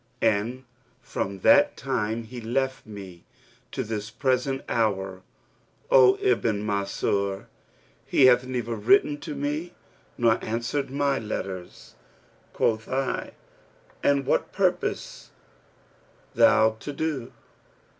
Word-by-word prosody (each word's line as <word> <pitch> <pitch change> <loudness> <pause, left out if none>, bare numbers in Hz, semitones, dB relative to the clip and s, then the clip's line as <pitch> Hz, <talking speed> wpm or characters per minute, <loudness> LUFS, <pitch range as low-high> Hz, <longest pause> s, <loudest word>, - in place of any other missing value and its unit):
And 115 +4 +1 0.4
from 100 -6 -4
the 190 - +6
time 115 -4 -2
he 120 +2 -9
left 130 +2 -2
me 95 -5 -10 0.5
to - - -2
this 105 -1 -4
present 130 +3 0
hour, 95 -4 -1 0.7
O 435 -6 +7
Ibn 115 - +1
Mansur, 100 -1 -1 0.6
he 135 - +5
hath 125 -1 +6
neither 120 -2 -3
written 145 - +3
to 150 - -6
me 150 +5 -3 0.4
nor 115 -1 +2
answered 115 +5 -2
my 140 0 0
letters.' 95 -4 -6 0.6
Quoth 110 -1 0
I, 130 0 -2 0.7
'And 140 -1 +2
what - - 0
purposes" - - -1 1.0
thou 110 0 +4
to 145 - -6
do?' 145 -4 -3
115 Hz, 105 wpm, -26 LUFS, 105-135 Hz, 1.0 s, O